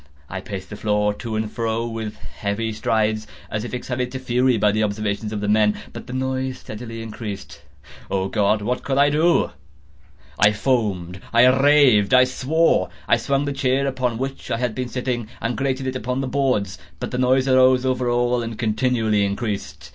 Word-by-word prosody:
I 95 0 -4
paced 95 -1 -7
the - - -5
floor 105 0 +1
to 110 +1 -5
and 110 0 -2
fro 115 0 -1
with 110 -2 -5
heavy 110 +2 -4
strides, 110 0 0 0.2
as 105 -1 -2
if 120 - -6
excited 125 0 -3
to - - -2
fury 125 -1 +2
by 105 0 +3
the 110 +1 0
observations 105 0 -2
of 105 -2 -3
the 105 - -2
men—but 105 0 0
the 125 - -7
noise 130 0 -2
steadily 115 +1 -8
increased. 105 -2 -7 0.5
Oh 95 -1 0
God! 105 +1 +1
what 125 +4 -1
could 135 -1 -1
I 145 +1 +5
do? 160 +4 +3 0.9
I 105 0 +5
foamed—I 105 -2 +1
raved—I 130 -3 +5
swore! 130 - +1 0.2
I - - +4
swung 140 +4 0
the 145 - -2
chair 135 0 +1
upon 130 -3 -1
which 135 +2 -5
I - - 0
had 120 -2 -1
been 125 0 -4
sitting, 125 -2 -2
and 115 +1 -2
grated 135 -1 -1
it 130 0 -2
upon 125 +2 -2
the 135 - -2
boards, 125 -8 0 0.2
but - - -4
the 125 - -2
noise 130 +1 +3
arose 130 0 +5
over 125 -1 0
all 120 0 +1
and 115 -1 -5
continually 110 -2 +1
increased. 100 - -3
120 Hz, 180 wpm, -22 LUFS, 105-130 Hz, 0.9 s, I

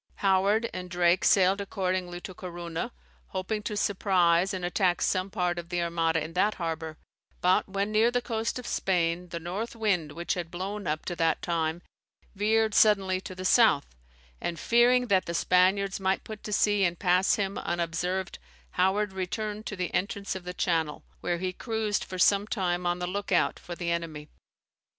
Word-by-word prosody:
Howard 200 +4 +3
and 180 0 -6
Drake 175 +1 +2
sailed 195 +1 +4
accordingly 185 -3 -2
to 185 - -8
Corunna, 170 -2 -5 0.4
hoping 210 +3 -3
to 210 0 -4
surprise 185 -3 +2
and 185 -2 -3
attack 180 0 +1
some 185 0 0
part 180 -3 -1
of 170 0 -9
the 175 -1 -1
Armada 165 -2 0
in 160 +1 -7
that 205 +4 +2
harbour; 160 -2 -4 0.4
but 180 +2 +2
when 200 +2 -1
near 220 +2 +4
the 245 +1 +1
coast 230 -1 -2
of 250 - -7
Spain, 175 -1 0
the 170 - -4
north 190 +8 -4
wind, 190 -9 0
which 170 +1 -2
had 175 -2 -4
blown 195 +3 -5
up 155 +1 -2
to 175 - -3
that 165 -1 +2
time, 165 0 -1 0.5
veered 215 +2 +2
suddenly 195 -4 +4
to 185 - -8
the 185 0 -6
south; 220 - +5 0.6
and 170 -1 -3
fearing 245 +1 +4
that 195 -5 +2
the 170 - -3
Spaniards 190 +3 +2
might 190 0 0
put 215 -1 -8
to 210 - -5
sea 205 0 +3
and 175 -2 +1
pass 180 +1 +3
him 200 -1 -2
unobserved, 175 +2 -2 0.3
Howard 195 +2 +1
returned 210 +3 -4
to 205 - -4
the 180 -2 -3
entrance 200 +1 -1
of 185 -2 -7
the 180 - -4
Channel, 160 -5 0 0.2
where 175 - -1
he 185 +1 -3
cruised 220 -1 -2
for 185 - -7
some 200 +3 +4
time 180 -4 -1
on 175 0 +1
the 180 - -3
look 200 +3 -4
out 175 - +2
for 175 - -7
the 170 -1 -2
enemy. 160 -3 -4
185 Hz, 180 wpm, -28 LUFS, 175-205 Hz, 0.6 s, south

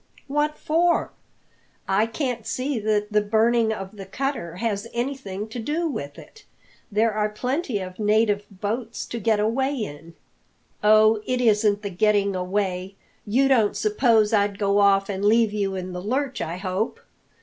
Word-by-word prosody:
"What 295 +2 -1
for? 340 +2 +1 0.8
I 200 +3 +2
can't 240 -2 -3
see 260 -1 -2
that 210 0 0
the 210 - +4
burning 225 +2 +2
of 195 -1 -6
the 195 -1 -8
cutter 230 - -3
has 205 +1 -2
anything 235 -6 -3
to 240 - -6
do 310 +8 -1
with 145 - -5
it. 430 - -14 0.5
There 220 +2 +2
are 210 0 0
plenty 255 +4 -2
of 185 0 -7
native 210 -1 +2
boats 220 +4 -4
to 235 - -5
get 220 0 +2
away 265 +6 0
in." 165 - -7 0.7
"Oh, 215 0 +5
it 255 -1 0
isn't 210 -3 +2
the 200 - -4
getting 200 +1 +2
away! 185 0 -2 0.3
You 260 +6 +3
don't 230 -6 +3
suppose 220 0 +3
I'd 200 -1 +2
go 200 0 +2
off 195 -1 +4
and 195 -1 -4
leave 220 0 +4
you 200 -2 -1
in 185 -1 -5
the 180 - -5
lurch, 255 +5 -2
I 170 +2 -3
hope? 190 +3 -2
215 Hz, 160 wpm, -24 LUFS, 200-235 Hz, 0.8 s, Oh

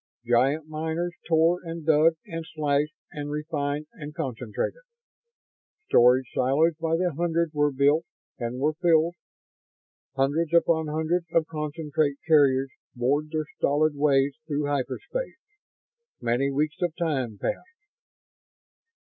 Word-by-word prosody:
Giant 135 +6 +2
miners 160 +3 -3
tore 165 +2 +3
and 165 -2 -6
dug 160 +1 +5
and 165 0 -5
slashed 150 0 0 0.2
and 145 -1 -5
refined 150 -1 -2
and 150 0 -9
concentrated. 130 - -3 1.1
Storage 125 +2 +5
silos 140 +6 +3
by 165 0 +1
the 180 -1 0
hundreds 170 0 0
were 145 -1 +2
built 145 +4 +3 0.3
and 120 +1 -3
were 150 +3 +1
filled. 165 0 +3 1.0
Hundreds 150 +5 +1
upon 160 -2 +3
hundreds 160 +3 -1
of 165 -1 +3
concentrate 150 -1 -2
carriers 135 -4 +4 0.2
bored 140 +5 0
their 155 -1 -2
stolid 150 +2 +2
ways 140 -1 +2
through 145 -1 -1
hyperspace. 145 - -3 0.8
Many 120 +4 +1
weeks 150 +2 -1
of 175 -3 0
time 135 - -2
passed. 370 - -4
150 Hz, 120 wpm, -26 LUFS, 140-165 Hz, 1.1 s, dug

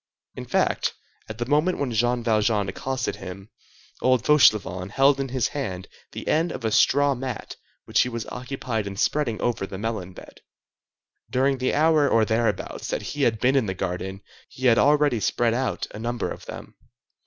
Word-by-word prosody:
In - - -7
fact, - - 0 0.3
at 110 - -6
the 120 - -2
moment 150 +7 +2
when 140 -3 -2
Jean 120 +2 +1
Valjean 110 -2 +2
accosted 130 +6 -3
him, 95 +2 -9 0.5
old 130 -3 +3
Fauchelevent 105 - +4
held 135 +1 +4
in 135 - -1
his 125 -2 0
hand 95 -11 -4 0.3
the - - -7
end 165 +2 +2
of - - -6
a 110 - +1
straw 145 +5 +4
mat 130 -3 -6 0.3
which - - +3
he 125 - 0
was 115 -2 -5
occupied 125 -4 -4
in 100 - -6
spreading 120 -2 0
over 120 -5 -1
the 95 - -7
melon 105 -4 -4
bed. - - -13 0.9
During 135 +1 +1
the 130 - 0
hour 155 -1 +4
or 115 -1 +3
thereabouts 110 -2 -1
that - - -3
he 145 - -4
had 115 -5 +2
been 130 +4 +2
in 130 -6 +2
the 95 - -3
garden 95 +1 -4 0.3
he 130 - -7
had 115 -2 +5
already 145 -4 +3
spread 115 +3 +1
out 130 +2 -1
a - - -8
number 120 +1 -2
of - - -9
them. - - -9
120 Hz, 185 wpm, -24 LUFS, 105-135 Hz, 0.9 s, had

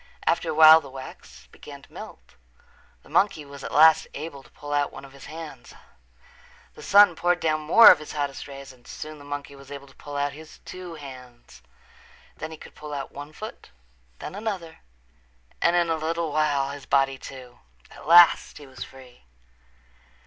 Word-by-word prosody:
After - - +1
a - - -1
while 160 +1 +9
the 140 - -12
wax 130 0 -12
began 140 -2 -13
to - - -20
melt. - - -12 0.7
The - - -19
monkey 175 -7 +1
was 140 -1 -12
at - - -6
last 160 +1 +6
able 150 -3 -7
to - - -21
pull 145 0 -8
out 145 -1 0
one 135 - -11
of 135 - -16
his 140 - -13
hands. 155 -4 -10 1.0
The - - -14
sun 200 -3 +6
poured 175 +2 +1
down 155 -2 0
more 170 +10 +8
of - - +3
his 155 - -9
hottest 145 -2 -4
rays 140 -1 -10
and 120 -1 -22
soon 155 0 -8
the - - -13
monkey 145 0 -7
was 140 0 -15
able 140 -1 -9
to 135 - -20
pull 145 -1 -8
out 140 0 -1
his 155 +1 -13
two 180 -2 -9
hands. 130 -5 -13 0.7
Then - - -7
he 160 - -10
could - - -14
pull 150 -1 -8
out 135 -1 -6
one 145 +1 -9
foot, 215 - -10 0.5
then - - -8
another, 195 -6 -5 0.8
and 170 - +3
in 170 -1 +2
a 160 - 0
little 165 0 -2
while 145 -2 0
his 140 -1 -10
body, 135 -1 +1
too. 125 -2 -11 0.3
At - - -13
last 170 +1 +6
he 145 - -12
was 130 -2 -9
free. 125 - -16
145 Hz, 190 wpm, -25 LUFS, 140-160 Hz, 1.0 s, while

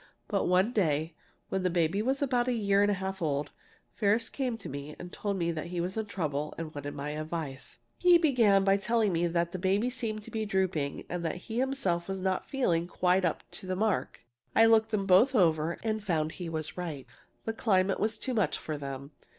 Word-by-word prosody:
But 200 -3 0
one 185 +6 +3
day, 160 -5 +1 0.4
when 190 - -1
the 185 - +1
baby 170 +3 +1
was 265 +5 0
about 250 -3 +1
a 250 - +2
year 200 -3 +2
and 205 - +4
a 205 - +2
half 190 0 -4
old, 145 -2 -1 0.4
Ferris 220 +2 +2
came 255 -4 -2
to 210 - -9
me 140 +2 -6
and 180 0 -9
told 200 -2 -2
me 170 -2 0
he 170 +2 -4
was 180 +2 -2
in 220 -1 -2
trouble 150 -6 -3
and 160 -1 -5
wanted 145 0 -6
my 145 +1 -4
advice. 155 -3 -4 0.2
"He 355 -1 +7
began 235 - +4
by 195 0 +4
telling 220 -1 +1
me 170 +1 +2
that 170 0 0
the 185 - -4
baby 200 +6 +1
seemed 225 -4 -3
to - - -12
be 220 -1 -2
drooping 190 -8 -1
and 175 -1 -4
that 165 - -1
he 225 +1 -3
himself 260 -11 0
was 195 0 -3
not 185 0 -1
feeling 175 -11 +1
quite 180 +1 +2
up 165 - -1
to 185 - -5
the 185 - -1
mark. 215 +1 -1 0.3
I 225 - +7
looked 225 -1 +5
them 210 -3 0
both 215 +8 +5
over 165 -4 +3
and 220 -2 -1
found 160 -5 0
he 175 -1 -6
was 155 -2 -3
right. 155 -7 -5 0.4
The 225 - -1
climate 195 -4 +2
was 220 +1 0
too 260 +3 -3
much 215 -5 +1
for 155 -2 -5
them. 140 0 -6
190 Hz, 215 wpm, -30 LUFS, 165-220 Hz, 0.4 s, He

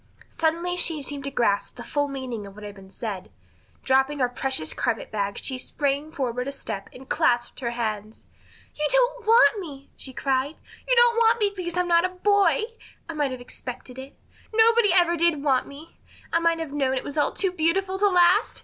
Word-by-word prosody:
Suddenly 335 +2 -1
she 320 -4 +2
seemed 280 0 -4
to - - -2
grasp 230 -7 0
the - - -8
full 290 -1 -1
meaning 255 -6 -6
of 195 - -13
what 210 - -11
had 205 -1 -7
been 195 -1 -15
said. 195 -3 -6 0.5
Dropping 265 +2 +2
her 250 -3 +1
precious 250 -9 -3
carpet 225 - -2
bag 200 -2 -2
she 260 -2 -3
sprang 285 +2 -2
forward 250 -4 -3
a - - -2
step 200 -7 -6
and 265 +1 -13
clasped 240 0 0
her 240 - -2
hands. 220 -2 -4 0.5
"You 300 0 -1
don't - - +2
want 455 -1 +6
me!" 280 -7 -9
she 265 - -6
cried. 270 +3 -1 0.3
"You - - +5
don't 475 -1 +5
want 460 0 +4
me 410 -2 +1
because 355 -2 -4
I'm 360 0 +1
not 340 -1 +4
a 370 - +1
boy! 405 +3 +2 0.4
I 330 - -5
might 295 -3 0
have 255 -1 -7
expected 250 +1 -8
it. 265 +1 -11 0.3
Nobody 450 -1 +5
ever 345 -2 +4
did 335 -3 +2
want 265 -3 +2
me. 295 +4 -13 0.3
I 335 - +4
might 335 0 +2
have 320 -3 -5
known 270 -2 0
it - - -3
was 285 - -7
all 295 - +2
too 380 -2 0
beautiful 375 +3 0
to 410 0 +4
last. 360 +3 +3
290 Hz, 205 wpm, -25 LUFS, 255-360 Hz, 0.5 s, want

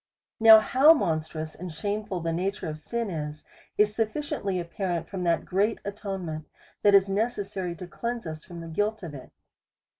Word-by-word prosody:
Now 220 -1 +10
how 275 +8 +6
monstrous 160 - -2
and 180 +1 -7
shameful 200 +2 -3
the 165 0 -1
nature 190 +2 -2
of 155 0 -5
sin 230 +6 -3
is, 150 -2 -5 0.3
is 210 0 +4
sufficient!} 230 +7 -2 0.2
apparent 170 -1 -3
from 190 -2 -4
that 170 -1 +1
great 205 +4 +1
atonement 190 -7 -5 0.3
that 205 -1 +6
is 195 0 +6
necessary 195 -4 -2
to 180 - -8
cleanse 235 +5 -4
us 155 -1 -6
from 175 -2 -9
the 165 - -8
guilt 210 +5 -1
of 165 -4 -6
it. 130 -3 -10
190 Hz, 170 wpm, -27 LUFS, 165-210 Hz, 0.3 s, Now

